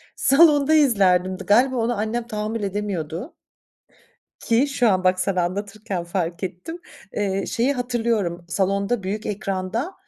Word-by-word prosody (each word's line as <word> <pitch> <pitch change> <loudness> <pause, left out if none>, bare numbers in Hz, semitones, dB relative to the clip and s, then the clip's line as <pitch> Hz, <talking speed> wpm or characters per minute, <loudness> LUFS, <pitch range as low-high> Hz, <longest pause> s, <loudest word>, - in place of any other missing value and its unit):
salonda 295 0 +5
izlerdim, 190 - +3
dı - - -8
galiba 250 +6 +4
ona 240 0 0
annem 230 +3 -2
tahammül 215 -1 -3
edemiyordu. 195 - -4 1.1
Ki 235 +5 +2
şu 255 -5 +2
an 185 -2 +1
bak, 185 0 +2
sana 185 -1 0
anlatırken 200 +1 -4
fark 170 0 -3
ettim, 190 - -6 0.3
eee, 195 -1 -1
şeyi 250 +5 +1
hatırlıyorum 230 -9 -1
salonda 195 +4 0
büyük 205 +3 -4
ekranda, 205 - -3
205 Hz, 130 wpm, -22 LUFS, 185-240 Hz, 1.1 s, salonda